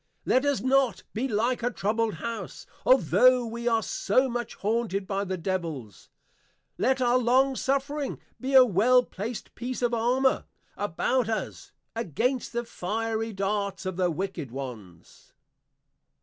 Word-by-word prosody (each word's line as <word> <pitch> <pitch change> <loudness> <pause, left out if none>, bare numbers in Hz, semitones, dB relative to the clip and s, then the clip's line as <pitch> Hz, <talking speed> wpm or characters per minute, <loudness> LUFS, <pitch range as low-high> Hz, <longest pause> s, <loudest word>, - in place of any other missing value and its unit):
Let 260 +2 +3
us 285 -2 +1
not 260 -5 +2
be 235 +5 -1
like 240 +2 0
a 240 - +1
Troubled 220 -1 -1
House, 230 +7 -6 0.2
altho' 255 - +5
we 235 +1 -5
are 225 -2 +2
so 255 +8 +1
much 240 -2 -4
haunted 210 -2 -1
by 195 +1 -1
the 190 -1 -3
Devils. 160 - -4 0.7
Let 260 0 +2
our 245 +1 +4
Long 260 +3 +3
suffering 275 +2 -1 0.2
be 265 +1 -1
a 260 -1 +10
well 245 +4 +4
placed 220 +2 -6
piece 250 +1 -5
of 240 0 +1
Armour, 250 +3 +2 0.3
about 215 +5 0
us, 220 -1 -4 0.2
against 235 - -1
the 235 0 -2
Fiery 225 +3 -2
Darts 200 -1 -2
of 185 -1 -3
the 180 0 +1
wicked 170 -4 -4
ones. 115 -10 -9
225 Hz, 140 wpm, -27 LUFS, 195-255 Hz, 0.7 s, a